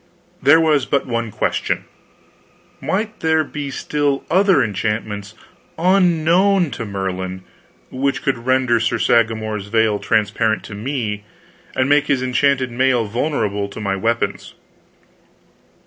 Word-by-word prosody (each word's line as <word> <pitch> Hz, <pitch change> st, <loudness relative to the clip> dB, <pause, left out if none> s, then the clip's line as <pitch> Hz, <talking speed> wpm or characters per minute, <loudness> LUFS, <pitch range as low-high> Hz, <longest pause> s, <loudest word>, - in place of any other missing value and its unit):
There 145 Hz, +4 st, +6 dB
was 155 Hz, -5 st, +2 dB
but 140 Hz, -, 0 dB
one 115 Hz, -2 st, -2 dB
question: -, -, -2 dB, 1.0 s
might 205 Hz, +9 st, -2 dB
there 160 Hz, -1 st, +2 dB
be 145 Hz, -1 st, -6 dB
still 145 Hz, 0 st, -1 dB
other 190 Hz, -5 st, +4 dB
enchantments, 105 Hz, -1 st, -3 dB, 0.4 s
unknown 180 Hz, 0 st, +3 dB
to 115 Hz, -, -5 dB
Merlin, 95 Hz, -1 st, -4 dB, 0.5 s
which 135 Hz, +1 st, -1 dB
could 125 Hz, -3 st, -2 dB
render 130 Hz, -2 st, +3 dB
Sir 110 Hz, +1 st, 0 dB
Sagramor's 110 Hz, -3 st, +1 dB
veil 110 Hz, -1 st, +2 dB
transparent 110 Hz, +1 st, 0 dB
to -, -, -9 dB
me, 105 Hz, -2 st, -3 dB, 0.5 s
and 130 Hz, -, +1 dB
make 145 Hz, +1 st, +3 dB
his 135 Hz, -3 st, +1 dB
enchanted 130 Hz, 0 st, +1 dB
mail 125 Hz, -1 st, +2 dB
vulnerable 105 Hz, -3 st, -1 dB
to 100 Hz, -, -9 dB
my 100 Hz, -2 st, -1 dB
weapons? 115 Hz, +4 st, -2 dB
125 Hz, 120 wpm, -19 LUFS, 110-145 Hz, 1.0 s, There